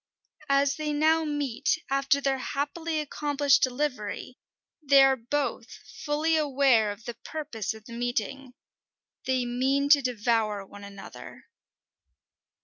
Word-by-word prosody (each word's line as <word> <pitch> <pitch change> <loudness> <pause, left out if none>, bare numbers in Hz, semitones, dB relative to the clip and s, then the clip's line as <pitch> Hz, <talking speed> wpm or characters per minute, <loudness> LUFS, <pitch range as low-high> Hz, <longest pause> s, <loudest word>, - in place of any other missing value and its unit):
As 275 0 +2
they 305 -1 -2
now 315 +2 +3
meet, 290 -5 -1
after 275 +1 +2
their 275 -1 0
happily 310 +4 -3
accomplished 285 -1 +1
delivery, 255 -3 -2 0.4
they 280 -2 +6
are 270 0 +5
both 250 -1 -3 0.3
fully 305 +2 +1
aware 270 -7 +3
of 205 +2 -11
the 240 - -4
purpose 230 -4 -5
of 220 -1 -14
the 235 - -10
meeting: 245 +2 -3 0.7
they 260 -1 +1
mean 265 +4 0
to 285 -1 +7
devour 225 -4 0
one 205 +1 -13
another. 200 -1 -11
270 Hz, 125 wpm, -27 LUFS, 235-290 Hz, 0.7 s, to